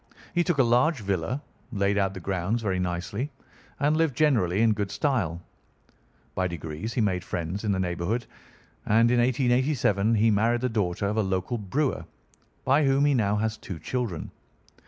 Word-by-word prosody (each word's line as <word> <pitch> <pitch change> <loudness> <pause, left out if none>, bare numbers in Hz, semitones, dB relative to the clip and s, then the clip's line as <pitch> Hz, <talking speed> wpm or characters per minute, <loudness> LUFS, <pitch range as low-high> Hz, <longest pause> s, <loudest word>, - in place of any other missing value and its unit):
He 175 - +2
took 175 -3 0
a 135 - +5
large 125 +4 +2
villa, 100 - -2 0.3
laid 100 -2 +1
out 95 -1 0
the - - -5
grounds 95 +5 -2
very 95 -3 0
nicely, 90 +9 -3 0.5
and 150 +2 +2
lived 160 -5 +1
generally 115 - +3
in 110 -1 +4
good 105 -2 -2
style. 95 - -1 0.9
By 95 0 0
degrees 85 +5 -5
he 125 - +2
made 95 -4 0
friends 90 +3 -4
in 105 - +1
the 95 - 0
neighbourhood, 95 +6 -1 0.6
and 115 +2 +4
in 125 - +3
1887 120 -3 +2
he 110 +1 +4
married 115 +3 +2
the 130 - 0
daughter 100 -4 -1
of 105 +2 -1
a - - +4
local 95 +4 -1
brewer, 130 +8 -1 0.6
by 140 +4 +4
whom 135 +1 +3
he 145 - +3
now 105 -5 +2
has 110 +1 -1
two 90 - -7
children. 115 -4 -4
110 Hz, 175 wpm, -26 LUFS, 95-125 Hz, 0.9 s, a